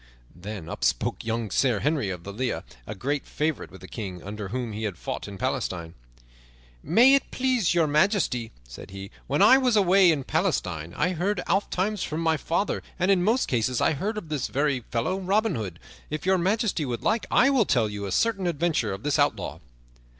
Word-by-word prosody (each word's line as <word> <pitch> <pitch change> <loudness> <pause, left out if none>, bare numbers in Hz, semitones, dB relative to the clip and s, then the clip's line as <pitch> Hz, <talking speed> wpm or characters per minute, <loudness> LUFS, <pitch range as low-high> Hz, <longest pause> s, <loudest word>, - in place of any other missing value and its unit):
Then 95 -1 -7
up - - -6
spake - - 0
young 115 -2 -2
Sir 120 -2 +2
Henry 145 -7 0
of 90 -2 -5
the 100 - -7
Lea, 125 +4 -2 0.3
a 105 - -5
great 140 +6 -2
favorite 150 -1 -2
with 95 - -14
the 95 - -10
King, 95 -6 -6
under 105 +1 -6
whom 120 +2 -3
he 105 - -5
had 100 -5 -4
fought - - -5
in 100 -1 -8
Palestine. 95 -9 -3 0.9
"May 235 - +5
it 275 - +2
please 250 -9 +1
Your 170 -2 +4
Majesty," 150 - +1 0.2
said - - -10
he, 95 +1 -8 0.2
"when 145 +2 +2
I 265 - +8
was 250 -3 +2
away 190 -2 +5
in 145 -4 -1
Palestine 95 - -1
I 180 - +2
heard 185 +3 -1
ofttimes 200 +1 0
from 155 - -3
my 160 -1 +2
father, 170 +6 -1 0.2
and 185 +2 +2
in 190 -2 +3
most 230 +6 +2
cases 125 0 0
I - - +3
heard 205 +9 -3
of 170 -7 -6
this 150 -4 -1
very 140 -1 0
fellow, 125 +11 -1
Robin 200 +2 +1
Hood. 100 - -4 0.3
If 155 +2 -4
Your 190 0 +3
Majesty 200 -1 0
would 125 -4 -4
like 225 - +1
I 270 +3 +4
will 255 -6 +3
tell 120 -9 +2
you 100 -1 -5
a - - -5
certain 200 - +1
adventure 160 - 0
of 95 +3 -8
this 145 -2 +1
outlaw." - - 0
150 Hz, 200 wpm, -26 LUFS, -, 0.9 s, I